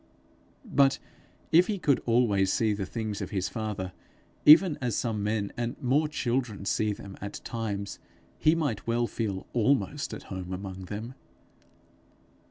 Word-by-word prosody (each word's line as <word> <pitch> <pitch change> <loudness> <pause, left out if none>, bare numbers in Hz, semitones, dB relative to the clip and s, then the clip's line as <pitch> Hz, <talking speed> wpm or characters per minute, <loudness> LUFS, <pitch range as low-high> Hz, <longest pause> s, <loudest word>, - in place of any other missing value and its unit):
But 135 0 +3 0.5
if 175 +3 +6
he 210 - -1
could 145 -7 +2
always 105 -5 +3
see 110 -2 +2
the 100 -2 -3
things 110 -3 -4
of - - -4
his 95 -2 -1
father 105 -5 -4 0.5
even 160 +2 +9
as 125 -3 0
some 110 -4 -1
men 105 -1 -1
and 120 0 -3
more 140 +5 +2
children 120 -8 -2
see 105 +1 +1
them 100 -1 -8
at 100 0 -5
times, 100 -3 -4 0.4
he 155 +1 +4
might 145 -12 -2
well 120 +1 +2
feel 105 -5 -3
almost 140 +4 +1
at - - -9
home 95 -1 -5
among 95 0 -6
them. 110 +6 -6
110 Hz, 150 wpm, -28 LUFS, 100-130 Hz, 0.5 s, even